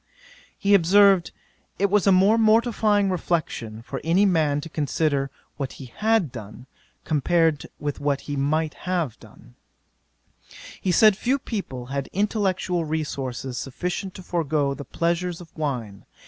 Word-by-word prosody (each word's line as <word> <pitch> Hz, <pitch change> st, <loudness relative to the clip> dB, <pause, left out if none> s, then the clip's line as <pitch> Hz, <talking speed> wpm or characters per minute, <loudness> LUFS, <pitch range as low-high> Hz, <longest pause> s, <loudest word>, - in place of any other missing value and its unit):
'He 200 Hz, +1 st, +2 dB
observed, 195 Hz, 0 st, +5 dB, 0.5 s
"it 200 Hz, 0 st, +1 dB
was 205 Hz, -1 st, +3 dB
a -, -, +7 dB
most 195 Hz, +5 st, +5 dB
mortifying 215 Hz, -3 st, +3 dB
reflexion 140 Hz, -11 st, -2 dB
for -, -, -6 dB
any 175 Hz, +5 st, +3 dB
man 155 Hz, -6 st, +2 dB
to 160 Hz, -, -7 dB
consider, 145 Hz, -2 st, 0 dB, 0.3 s
what 135 Hz, -2 st, -4 dB
he 130 Hz, -4 st, -11 dB
had 220 Hz, -, +2 dB
done, 115 Hz, +1 st, -10 dB, 0.4 s
compared 160 Hz, 0 st, +1 dB
with 145 Hz, -1 st, -3 dB
what 145 Hz, -1 st, 0 dB
he 145 Hz, -, -5 dB
might 150 Hz, +3 st, 0 dB, 0.2 s
have 170 Hz, -10 st, -1 dB
done." -, -, -17 dB, 1.3 s
'He 185 Hz, -, +1 dB
said 215 Hz, +3 st, +6 dB
few 250 Hz, +7 st, 0 dB
people 190 Hz, -, -5 dB
had 140 Hz, -1 st, -3 dB
intellectual 190 Hz, -3 st, 0 dB
resources 135 Hz, -5 st, -3 dB
sufficient 180 Hz, +7 st, -4 dB
to 185 Hz, -, -9 dB
forego 155 Hz, -5 st, 0 dB
the 140 Hz, 0 st, -8 dB
pleasures 170 Hz, +1 st, -1 dB
of 170 Hz, -3 st, -14 dB
wine. 125 Hz, -10 st, -4 dB
165 Hz, 140 wpm, -24 LUFS, 140-195 Hz, 1.3 s, a